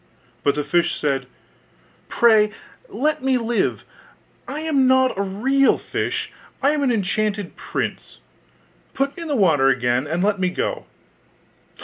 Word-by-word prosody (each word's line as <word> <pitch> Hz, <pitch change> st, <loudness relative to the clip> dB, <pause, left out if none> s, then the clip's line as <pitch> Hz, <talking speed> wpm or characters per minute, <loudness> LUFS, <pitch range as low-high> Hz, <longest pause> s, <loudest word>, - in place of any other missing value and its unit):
But 140 Hz, 0 st, +2 dB
the 150 Hz, -, -1 dB
fish 175 Hz, +3 st, 0 dB
said, 135 Hz, -3 st, -1 dB, 0.8 s
'Pray 220 Hz, -3 st, +4 dB, 0.4 s
let 305 Hz, +2 st, -1 dB
me 265 Hz, -1 st, +2 dB
live! 235 Hz, -1 st, -1 dB, 0.6 s
I 300 Hz, +3 st, -5 dB
am 290 Hz, -5 st, +2 dB
not 260 Hz, 0 st, +3 dB
a 195 Hz, -, -2 dB
real 255 Hz, +8 st, +2 dB
fish; -, -, -3 dB, 0.3 s
I 280 Hz, +1 st, +3 dB
am 300 Hz, -1 st, -1 dB
an 270 Hz, -3 st, +2 dB
enchanted 205 Hz, -2 st, -1 dB
prince: -, -, -5 dB, 0.8 s
put 275 Hz, +1 st, -1 dB
me -, -, -9 dB
in 335 Hz, -, -5 dB
the 290 Hz, -, 0 dB
water 160 Hz, -, +3 dB
again, 125 Hz, 0 st, +1 dB
and 170 Hz, +4 st, -1 dB
let 200 Hz, -1 st, +1 dB
me 185 Hz, -1 st, +1 dB
go! -, -, -3 dB
215 Hz, 145 wpm, -21 LUFS, 175-270 Hz, 0.8 s, Pray